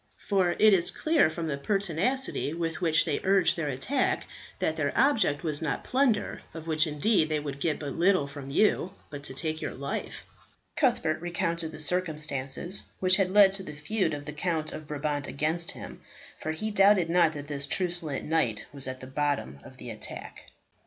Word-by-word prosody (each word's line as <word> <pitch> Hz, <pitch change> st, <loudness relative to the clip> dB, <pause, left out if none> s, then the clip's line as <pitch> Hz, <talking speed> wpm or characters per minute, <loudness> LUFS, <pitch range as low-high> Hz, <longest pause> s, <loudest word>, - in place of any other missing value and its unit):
For 185 Hz, -3 st, +2 dB
it 215 Hz, -1 st, +6 dB
is 175 Hz, -3 st, +2 dB
clear 315 Hz, -, +2 dB
from 165 Hz, +1 st, -5 dB
the 140 Hz, -2 st, -3 dB
pertinacity 195 Hz, -, -1 dB
with 165 Hz, +1 st, -3 dB
which 160 Hz, -3 st, +3 dB
they -, -, -1 dB
urged 190 Hz, -2 st, +3 dB
their 165 Hz, -3 st, -3 dB
attack 145 Hz, -, -1 dB, 0.3 s
that 160 Hz, -, -1 dB
their 145 Hz, -3 st, -1 dB
object 225 Hz, -, +2 dB
was 155 Hz, -2 st, -2 dB
not 155 Hz, -3 st, -2 dB
plunder, 255 Hz, -5 st, 0 dB
of 160 Hz, -1 st, -7 dB
which 160 Hz, 0 st, +1 dB
indeed 155 Hz, +3 st, +1 dB
they 155 Hz, -1 st, 0 dB
would 140 Hz, -2 st, -6 dB
get 155 Hz, +1 st, 0 dB
but 145 Hz, -3 st, -5 dB
little 185 Hz, -2 st, +3 dB
from 140 Hz, -1 st, -9 dB
you, 185 Hz, +3 st, +2 dB, 0.2 s
but 145 Hz, -1 st, -7 dB
to 130 Hz, -, -8 dB
take 155 Hz, +2 st, -3 dB
your -, -, -4 dB
life." -, -, -5 dB, 0.5 s
Cuthbert 165 Hz, -, +1 dB
recounted 170 Hz, -2 st, -1 dB
the -, -, -9 dB
circumstances 155 Hz, 0 st, +1 dB, 0.2 s
which 185 Hz, 0 st, +5 dB
had 195 Hz, -2 st, +1 dB
led 200 Hz, 0 st, +7 dB
to 195 Hz, 0 st, 0 dB
the 155 Hz, -5 st, -8 dB
feud 160 Hz, +1 st, -1 dB
of 145 Hz, 0 st, -8 dB
the 150 Hz, -, -6 dB
Count 155 Hz, 0 st, -2 dB
of 155 Hz, -, -8 dB
Brabant 145 Hz, -1 st, -3 dB
against 160 Hz, +4 st, +1 dB
him, -, -, -6 dB, 0.3 s
for 155 Hz, -, -4 dB
he 215 Hz, +8 st, -3 dB
doubted 195 Hz, -3 st, +5 dB
not 165 Hz, -1 st, +3 dB
that 145 Hz, -1 st, -7 dB
this 140 Hz, -1 st, -1 dB
truculent 175 Hz, -4 st, +2 dB
knight 150 Hz, -10 st, 0 dB
was 140 Hz, -2 st, +1 dB
at 130 Hz, 0 st, -6 dB
the -, -, -7 dB
bottom 135 Hz, -, -2 dB
of -, -, -14 dB
the -, -, -8 dB
attack. -, -, -7 dB
160 Hz, 190 wpm, -28 LUFS, 145-190 Hz, 0.5 s, led